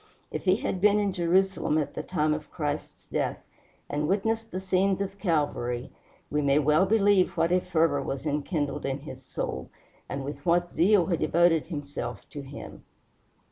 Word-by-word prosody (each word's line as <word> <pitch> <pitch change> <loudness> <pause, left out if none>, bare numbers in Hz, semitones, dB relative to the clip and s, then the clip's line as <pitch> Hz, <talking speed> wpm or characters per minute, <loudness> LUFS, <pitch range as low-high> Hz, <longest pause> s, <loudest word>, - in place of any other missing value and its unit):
If - - -4
he 185 0 +5
had 190 -3 -3
been 210 +1 +5
in 205 -2 +1
Jerusalem 185 -1 +2
at 150 - -1
the - - -3
time 155 -4 0
of 150 0 -5
Christ's 150 -1 -4
death, - - -2 0.4
and 150 +1 -1
witnessed 225 +4 0
the 185 - -4
scenes 190 +1 +1
of 200 0 -4
Calvary, 145 - -1 0.4
we 150 - +1
may 140 0 +3
well 150 +5 +4
believe 205 -3 +3
what 165 - +2
a 180 0 +4
fervor 160 -5 +2
was 135 +2 -4
enkindled 145 0 -1
in 135 +1 -2
his 150 - -9
soul, 65 - -4 0.4
and 140 0 -3
with 140 0 -6
what 175 +1 +2
zeal 185 +1 +4
he 175 -3 0
devoted 165 +1 +3
himself 140 - -5
to 145 - -6
him. 140 +1 -10
165 Hz, 175 wpm, -27 LUFS, 145-190 Hz, 0.4 s, he